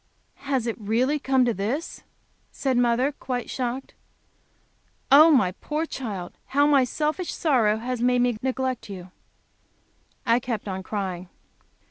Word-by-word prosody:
"Has 265 Hz, -4 st, +1 dB
it 230 Hz, -, -2 dB
really 240 Hz, +8 st, +1 dB
come 265 Hz, -2 st, +2 dB
this!" 240 Hz, -, -2 dB, 0.5 s
said 270 Hz, -2 st, -1 dB
mother, 245 Hz, +3 st, +2 dB
quite 250 Hz, -3 st, -5 dB
shocked. 255 Hz, +1 st, -3 dB, 1.2 s
"Oh, 305 Hz, +4 st, +9 dB
my 250 Hz, -, +4 dB
poor 300 Hz, -, -3 dB
child, 205 Hz, -, -6 dB
how 285 Hz, +2 st, +3 dB
my 285 Hz, -3 st, +5 dB
selfish 305 Hz, +7 st, -2 dB
sorrow 235 Hz, -10 st, +2 dB
has 245 Hz, +1 st, -4 dB
made 245 Hz, 0 st, +3 dB
me 245 Hz, -2 st, +1 dB
neglect 260 Hz, -3 st, -2 dB
you." 185 Hz, -2 st, -8 dB, 1.1 s
I 235 Hz, 0 st, +4 dB
kept 235 Hz, -4 st, -4 dB
on 190 Hz, -1 st, -3 dB
crying. 185 Hz, -3 st, -4 dB
250 Hz, 130 wpm, -25 LUFS, 220-270 Hz, 1.2 s, Oh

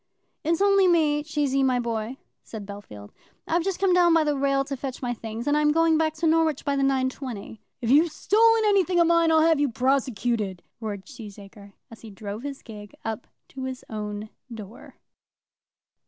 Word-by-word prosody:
"It's 335 Hz, +4 st, +1 dB
only 395 Hz, -1 st, +4 dB
me, 310 Hz, -4 st, +3 dB
Cheesy, 290 Hz, -3 st, 0 dB
my 255 Hz, -2 st, +2 dB
boy," 230 Hz, +1 st, -3 dB, 0.2 s
said 215 Hz, -3 st, -9 dB
Bellfield. 185 Hz, -, -10 dB, 0.4 s
"I've 335 Hz, +1 st, +1 dB
just 390 Hz, 0 st, -2 dB
come 385 Hz, -2 st, +3 dB
down 350 Hz, -2 st, +5 dB
by 325 Hz, -, +4 dB
the 295 Hz, -1 st, 0 dB
rail 275 Hz, 0 st, +1 dB
to 275 Hz, -, -4 dB
fetch 265 Hz, -1 st, -6 dB
my 245 Hz, -1 st, -1 dB
things, 225 Hz, 0 st, -7 dB
and 290 Hz, 0 st, +2 dB
I'm 300 Hz, 0 st, +3 dB
going 330 Hz, +1 st, +3 dB
back 315 Hz, -1 st, 0 dB
to 325 Hz, +1 st, -2 dB
Norwich 320 Hz, -2 st, +2 dB
by 280 Hz, -1 st, 0 dB
the 275 Hz, -, 0 dB
9.20. 260 Hz, -5 st, -2 dB, 0.2 s
"If 235 Hz, 0 st, 0 dB
you've 310 Hz, +4 st, +5 dB
stolen 450 Hz, +6 st, +3 dB
anything 375 Hz, -4 st, +3 dB
of 340 Hz, -, +5 dB
mine 335 Hz, -1 st, +3 dB
I'll 320 Hz, 0 st, +5 dB
have 320 Hz, -1 st, +4 dB
you 290 Hz, -1 st, +2 dB
prosecuted," 240 Hz, -6 st, -1 dB, 0.2 s
roared 205 Hz, -4 st, -5 dB
Cheesacre, 205 Hz, -5 st, -12 dB, 0.2 s
as 230 Hz, -, -13 dB
he 225 Hz, -, -10 dB
drove 205 Hz, +1 st, -7 dB
his 280 Hz, 0 st, -7 dB
gig 210 Hz, -3 st, -11 dB
up 225 Hz, +1 st, -4 dB, 0.2 s
to 265 Hz, -1 st, -7 dB
his 260 Hz, -1 st, -6 dB
own 210 Hz, 0 st, -5 dB, 0.2 s
door. 225 Hz, +2 st, -10 dB
270 Hz, 185 wpm, -25 LUFS, 220-320 Hz, 0.4 s, down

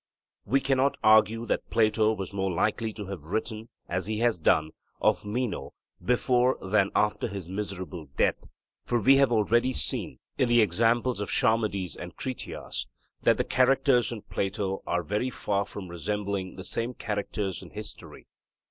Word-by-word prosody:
We 135 Hz, +6 st, +2 dB
cannot 135 Hz, +1 st, +2 dB
argue 110 Hz, +1 st, +5 dB
that -, -, -2 dB
Plato 110 Hz, -1 st, +3 dB
was 95 Hz, -2 st, -6 dB
more 95 Hz, -1 st, -1 dB
likely 110 Hz, +5 st, 0 dB
to 105 Hz, -1 st, -7 dB
have 95 Hz, -4 st, -6 dB
written, 110 Hz, +7 st, -4 dB, 0.2 s
as 90 Hz, +1 st, -2 dB
he 110 Hz, 0 st, -2 dB
has 115 Hz, -4 st, +2 dB
done, 80 Hz, 0 st, +3 dB, 0.3 s
of -, -, +2 dB
Meno 120 Hz, +2 st, -3 dB, 0.3 s
before 125 Hz, +1 st, +2 dB
than 100 Hz, 0 st, +2 dB
after 105 Hz, +2 st, +1 dB
his 100 Hz, -5 st, -6 dB
miserable 95 Hz, -4 st, -5 dB
death; -, -, +1 dB, 0.4 s
for 120 Hz, -, 0 dB
we 135 Hz, +6 st, +6 dB
have 135 Hz, -3 st, +4 dB
already 120 Hz, +3 st, +2 dB
seen, -, -, 0 dB, 0.2 s
in 125 Hz, -, +3 dB
the 120 Hz, 0 st, +5 dB
examples 115 Hz, +4 st, +2 dB
of 105 Hz, -, -3 dB
Charmides 110 Hz, -7 st, +1 dB
and 90 Hz, -1 st, -8 dB
Critias, 130 Hz, -1 st, -5 dB, 0.3 s
that -, -, +4 dB
the -, -, +1 dB
characters 130 Hz, -1 st, +3 dB
in 110 Hz, -3 st, -6 dB
Plato 95 Hz, -1 st, -2 dB
are 90 Hz, 0 st, 0 dB
very 105 Hz, +9 st, -1 dB
far 100 Hz, -4 st, -1 dB
from 95 Hz, -1 st, -8 dB
resembling 100 Hz, +2 st, -3 dB
the 95 Hz, -, -8 dB
same 115 Hz, +5 st, -3 dB
characters 100 Hz, -2 st, -3 dB
in -, -, -11 dB
history. -, -, -9 dB
105 Hz, 160 wpm, -28 LUFS, 95-120 Hz, 0.4 s, we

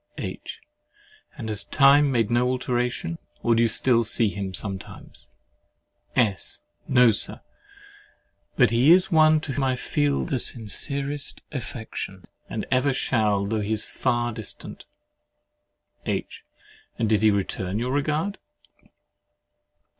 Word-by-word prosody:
H. -, -, -6 dB, 0.8 s
And 110 Hz, -, -6 dB
has 105 Hz, -2 st, -2 dB
time 140 Hz, +1 st, +5 dB
made 115 Hz, -3 st, +1 dB
no 120 Hz, +1 st, +3 dB
alteration? 125 Hz, +6 st, -2 dB, 0.2 s
Or 120 Hz, -, +3 dB
do 115 Hz, -, +3 dB
you 115 Hz, -, +3 dB
still 115 Hz, +1 st, +3 dB
see 110 Hz, 0 st, +1 dB
him 100 Hz, -1 st, -4 dB
sometimes? 95 Hz, 0 st, -6 dB, 0.9 s
S. 105 Hz, -6 st, 0 dB, 0.3 s
No, 125 Hz, -3 st, +6 dB
Sir! 105 Hz, -, -2 dB, 1.1 s
But 125 Hz, -5 st, +4 dB
he 120 Hz, +5 st, +4 dB
is 185 Hz, +3 st, +6 dB
one 155 Hz, -1 st, +5 dB
to 155 Hz, -, -4 dB
whom 135 Hz, +1 st, -1 dB
I 130 Hz, -1 st, +1 dB
feel 145 Hz, +3 st, 0 dB
the 140 Hz, -7 st, -1 dB
sincerest 140 Hz, +6 st, -3 dB
affection, 110 Hz, -7 st, -6 dB, 0.2 s
and -, -, -4 dB
ever 130 Hz, +2 st, +2 dB
shall, 105 Hz, -6 st, +1 dB
though 110 Hz, +1 st, -1 dB
he 105 Hz, +2 st, -1 dB
is 110 Hz, -, -1 dB
far 120 Hz, 0 st, -1 dB
distant. 110 Hz, -3 st, -7 dB, 1.2 s
H. -, -, -3 dB, 0.5 s
And 115 Hz, -, 0 dB
did 105 Hz, -1 st, +2 dB
he 110 Hz, -, +5 dB
return 100 Hz, -1 st, -1 dB
your 125 Hz, +3 st, -2 dB
regard? 155 Hz, +7 st, -1 dB
120 Hz, 130 wpm, -25 LUFS, 110-140 Hz, 1.2 s, No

